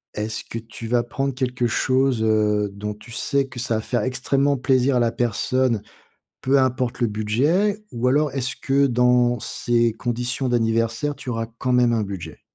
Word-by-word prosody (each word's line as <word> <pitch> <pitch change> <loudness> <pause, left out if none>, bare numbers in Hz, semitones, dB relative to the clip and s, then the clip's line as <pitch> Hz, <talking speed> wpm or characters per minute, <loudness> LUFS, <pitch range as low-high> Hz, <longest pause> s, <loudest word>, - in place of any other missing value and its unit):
est-ce 105 0 -3
que 115 - -6
tu 115 0 -9
vas 120 0 +2
prendre 135 +3 -2
quelque 125 -1 -1
chose, 130 0 +1
heu, 105 -1 +2
dont 105 +1 -5
tu 105 +3 -15
sais 140 +4 0
que 130 -2 -9
ça 120 -1 -1
va 110 - -1
faire 120 0 -1
extrêmement 135 +4 +1
plaisir 130 0 +2
à - - +3
la 120 -1 +2
personne, 120 0 0 0.6
peu 135 +2 +3
importe 130 -1 -1
le 120 - +2
budget? 145 - +1
Ou 120 +2 -1
alors 145 +3 +2
est-ce 130 -2 -1
que 140 +1 +2
dans 125 -1 +3
ces 120 -1 +1
conditions 125 +2 -2
d'anniversaire, 115 +4 0
tu - - -11
auras 115 -1 -2
quand 125 - -1
même 125 -1 +4
un 115 -2 +1
budget? 100 -4 -7
120 Hz, 180 wpm, -22 LUFS, 115-130 Hz, 0.6 s, même